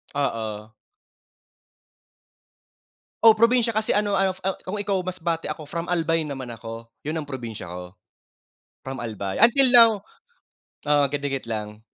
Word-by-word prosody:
Oo. 110 -6 -3 2.5
Oh, 225 -1 +7
probinsya 230 +1 +4
kasi 215 -1 0
ano 205 -1 +1
ah, 190 -1 +2
ano 190 0 -2
kung 205 +2 -3
ikaw 200 -1 0
Masbate 170 -3 -3
ako 150 -1 -6
from 170 +1 -3
Albay 165 -2 0
naman 135 -4 -6
ako, 115 0 -8 0.2
yun 155 - -2
ang 145 - -10
probinsya 115 -9 -6
ko. 90 +1 -8 0.9
From 135 -1 -6
Albay, 100 -4 -4
until 250 +3 +6
now 230 -2 +9 1.0
oo 145 -1 +4
kadikit 140 -2 -2
lang. 105 0 -5
150 Hz, 130 wpm, -24 LUFS, -, 2.5 s, now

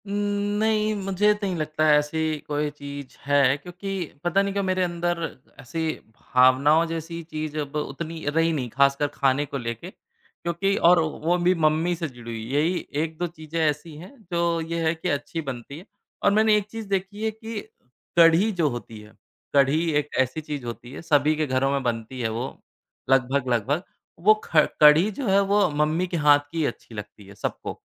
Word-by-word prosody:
उम, 200 - -4 0.5
नहीं, 215 0 +2
मुझे 195 +2 +3
नहीं 195 -3 -1
लगता 155 -1 -1
है 150 -1 +6
ऐसी 155 +1 -1
कोई 150 0 -1
चीज़ 140 -1 -9
है 140 -1 +4
क्योंकि 180 +5 -8 0.3
पता 175 +3 +2
नहीं 200 0 -1
क्यों 200 0 0
मेरे 185 -1 +1
अंदर 175 0 -1 0.4
ऐसी 160 +5 -3 0.3
भावनाओं 130 +6 +4
जैसी 165 +1 -5
चीज़ 155 0 -4
अब 145 0 -5
उतनी 155 +2 -4
रही 165 +2 +2
नहीं, 130 -5 -2
ख़ासकर 140 +3 +2
ख़ाने 140 0 +1
को 140 - -5
लेके 115 +7 -5
क्योंकि 195 +3 -4
और 175 -1 +6
वो 160 +2 0
भी 180 +1 +3
मम्मी 160 +3 +2
से 170 -1 -3
जुड़ी 120 -2 -10
हुई, 115 -1 -5
यही 160 +5 +1 0.2
1-2 165 +2 -3
चीजें 160 -1 -6
ऐसी 150 +1 -2
हैं 175 +4 -11 0.2
जो 170 -1 +1
ये 165 +1 -3
है 160 - +1
कि 165 +3 -3
अच्छी 145 +3 -2
बनती 135 -1 -7
हैं। 180 - -14 0.4
और 200 - +5
मैंने 215 +1 +4
एक 205 - -2
चीज़ 225 -2 -6
देखी 195 +2 -2
है 220 - +1
कि 220 0 -7 0.6
कढ़ी 170 +6 +6
जो 170 -6 +1
होती 120 -3 -7
है, 105 0 -16 0.4
कढ़ी 140 +3 +4 0.2
एक 150 0 -5
ऐसी 130 +4 0
चीज़ 145 -4 -6
होती 120 +1 -7
है, 140 - -8
सभी 155 -2 +3
के 155 0 0
घरों 130 +1 +1
में 140 -1 0
बनती 120 +1 -3
है 115 - 0
वो 115 +4 -3 0.6
लगभग-लगभग। 135 - +1 0.4
वो 205 +5 +6
ख 155 -2 +4 0.2
कढ़ी 150 +6 +7
जो 250 +4 -4
है, 195 0 +4
वो 200 0 +3
मम्मी 155 +4 0
के 175 - -3
हाथ 145 -1 +6
की 165 -2 0
अच्छी 120 -2 -6
लगती 105 0 -9
है 100 - -13
सबको। - - -5
155 Hz, 185 wpm, -24 LUFS, 140-175 Hz, 0.6 s, कढ़ी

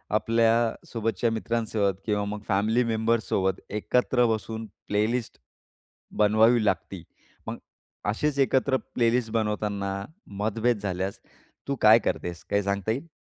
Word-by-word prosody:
आपल्यासोबतच्या 115 0 +1
मित्रांसोबत 110 -3 0
किंवा 105 -2 0
मग 105 +1 -5
फॅमिली 110 +4 +2
मेंबर्ससोबत 110 -4 0
एकत्र 125 +4 +1
बसून 110 +1 -5 0.2
प्लेलिस्ट 110 +3 -1 0.8
बनवावी 110 +2 +4
लागती. 95 -3 -1 0.4
मग - - -4 0.5
अशीच 140 +7 0
एकत्र 130 0 +3 0.2
प्लेलिस्ट 115 -1 +2
बनवताना 105 -3 -1 0.5
मतभेद 110 +2 +1
झाल्यास 95 -1 -3 0.5
तू 140 - 0
काय 110 +2 +8
करतेस? 85 -6 -3
काही 100 0 +1
सांगता 100 +1 -1
येईल? 135 +8 -3
110 Hz, 110 wpm, -26 LUFS, 105-115 Hz, 0.8 s, काय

